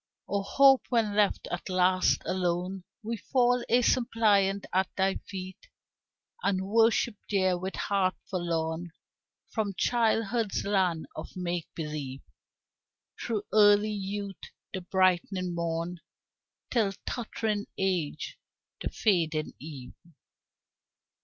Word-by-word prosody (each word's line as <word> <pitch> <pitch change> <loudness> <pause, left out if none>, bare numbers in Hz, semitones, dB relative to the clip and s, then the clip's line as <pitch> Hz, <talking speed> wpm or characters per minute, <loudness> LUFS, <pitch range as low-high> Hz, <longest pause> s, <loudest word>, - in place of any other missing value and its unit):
O 200 0 0
Hope, 270 +6 +5
when 225 -4 +1
left 210 -1 +2
at 175 +2 -4
last 185 0 +3
alone 180 +1 -1 0.2
We 230 +2 -3
fall 245 +1 +2
a 245 +2 +4
suppliant 205 -5 +3
at 185 0 +2
thy 190 0 +1
feet 190 - -8 0.7
And 190 -1 0
worship 225 +2 +3 0.2
there, 185 -3 +2
with 185 +2 -4
heart 190 -2 +1
forlorn 170 -2 -2 0.6
From 210 -4 -2
childhood's 225 -2 +1
land 185 -5 +1
of 155 - -6
make 175 -2 -2
believe, 150 -4 -5 1.0
Through 220 -4 -1
early 210 0 +6
youth, 200 -1 -4 0.3
the 190 - -3
brightening 185 0 +1
morn, 170 +1 -2 0.7
Till 215 -5 +2
tottering 220 -3 -2
age, 180 -6 -2 0.4
the - - -2
fading 165 -7 +1
eve. 135 -4 -9
190 Hz, 105 wpm, -29 LUFS, 175-215 Hz, 1.0 s, early